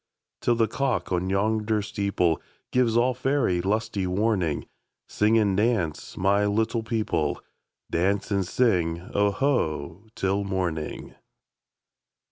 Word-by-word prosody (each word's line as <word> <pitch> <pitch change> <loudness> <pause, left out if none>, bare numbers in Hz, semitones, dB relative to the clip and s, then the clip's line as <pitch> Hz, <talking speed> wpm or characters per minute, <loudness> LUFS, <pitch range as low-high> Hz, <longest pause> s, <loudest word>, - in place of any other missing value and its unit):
Till 120 - +2
the 115 -1 +2
cock 130 0 -1
on 90 +1 0
yonder 105 +2 +1
steepleGives 100 +5 0
all 125 +2 +3
faery 130 -8 +1
lusty 105 0 -1
warning, 95 -4 0 0.4
Sing 110 +2 +2
and 100 -3 +2
dance, 105 -7 0
my 100 +2 +2
little 110 +3 0
people,—Dance 100 -2 -2
and 100 -2 +1
sing 90 -7 +1
"Oho" 100 - 0
till 95 +1 0
morning! 90 -6 -3
100 Hz, 100 wpm, -26 LUFS, 90-115 Hz, 0.4 s, all